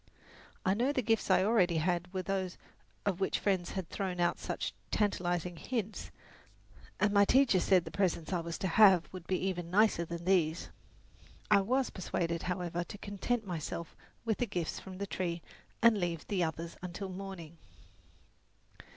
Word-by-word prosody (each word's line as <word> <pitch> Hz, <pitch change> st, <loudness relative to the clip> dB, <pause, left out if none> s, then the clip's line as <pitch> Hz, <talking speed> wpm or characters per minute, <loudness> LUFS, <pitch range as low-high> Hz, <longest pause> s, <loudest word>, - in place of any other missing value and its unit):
I 190 Hz, -, +4 dB
knew 245 Hz, +7 st, +1 dB
the 255 Hz, -, 0 dB
gifts 225 Hz, -1 st, +1 dB
I 185 Hz, -, +5 dB
already 190 Hz, -6 st, +3 dB
had 175 Hz, +2 st, 0 dB
were 190 Hz, -1 st, -2 dB
not -, -, -14 dB
those 190 Hz, -2 st, -2 dB, 0.5 s
of 195 Hz, -3 st, 0 dB
which 190 Hz, -, +1 dB
friends 190 Hz, -4 st, 0 dB
had 190 Hz, -3 st, -3 dB
thrown 185 Hz, -3 st, -3 dB
out 175 Hz, 0 st, +2 dB
such -, -, -3 dB, 0.2 s
tantalizing 175 Hz, -4 st, 0 dB
hints, 220 Hz, +1 st, -3 dB, 0.9 s
and 210 Hz, -1 st, +3 dB
my 200 Hz, 0 st, +6 dB
teacher 245 Hz, -3 st, +4 dB
said 180 Hz, -1 st, +3 dB
the 160 Hz, -, -7 dB
presents 185 Hz, -3 st, 0 dB
I 180 Hz, -, +1 dB
was 170 Hz, 0 st, -4 dB
to 190 Hz, -, -1 dB
have 185 Hz, -1 st, +6 dB
would 185 Hz, -2 st, -9 dB
be 185 Hz, -, +1 dB
even 180 Hz, -3 st, -2 dB
nicer 205 Hz, -2 st, +4 dB
than 170 Hz, 0 st, -6 dB
these. 170 Hz, -3 st, +1 dB, 0.8 s
I 200 Hz, -, +7 dB
was 255 Hz, +6 st, +1 dB
persuaded, 170 Hz, -3 st, -2 dB
however, 175 Hz, -1 st, -2 dB
to 190 Hz, -, -9 dB
content 210 Hz, +3 st, -2 dB
myself 170 Hz, -2 st, -5 dB, 0.3 s
with 220 Hz, -2 st, 0 dB
the 245 Hz, -, +1 dB
gifts 175 Hz, -5 st, -3 dB
from 190 Hz, -1 st, -9 dB
the 200 Hz, -, -3 dB
tree 175 Hz, -3 st, -3 dB, 0.4 s
and 230 Hz, -3 st, +6 dB
leave 170 Hz, -3 st, -2 dB
the 190 Hz, -4 st, 0 dB
others 165 Hz, +1 st, -4 dB
until 180 Hz, +2 st, -5 dB
morning. 185 Hz, -4 st, -8 dB
185 Hz, 170 wpm, -32 LUFS, 170-200 Hz, 0.9 s, I